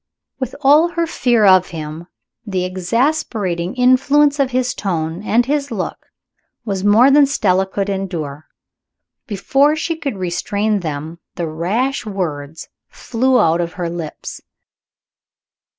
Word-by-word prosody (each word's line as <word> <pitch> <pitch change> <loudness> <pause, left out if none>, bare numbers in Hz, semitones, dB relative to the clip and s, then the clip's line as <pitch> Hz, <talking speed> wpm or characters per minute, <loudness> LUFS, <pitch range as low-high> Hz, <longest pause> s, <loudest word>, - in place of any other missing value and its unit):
With 260 -3 -4
all 295 +5 +5
her 335 -1 -1
fear 240 -8 +2
of 185 -2 +6
him, 160 0 -7 0.4
the 190 -4 -2
exasperating 190 - -1
influence 280 +3 +3
of 275 -2 +2
his 250 -1 0
tone 165 -3 -3
and 230 +3 +2
his 285 +1 -1
look 210 -7 -5 0.6
was 195 -3 -3
more 220 +6 +5
than 285 0 +6
Stella 190 -8 +1
could 195 +1 -3
endure. 170 -7 -4 0.8
Before 270 +9 +2
she 330 +1 -2
could 280 -9 -4
restrain 200 +4 -1
them, 160 0 -5 0.2
the 170 - -3
rash 200 - -1
words 160 -7 -5 0.2
flew 255 +2 0
out 165 +1 +3
of 170 0 -4
her 175 -2 -4
lips. 170 -3 -7
200 Hz, 130 wpm, -18 LUFS, 175-260 Hz, 0.8 s, of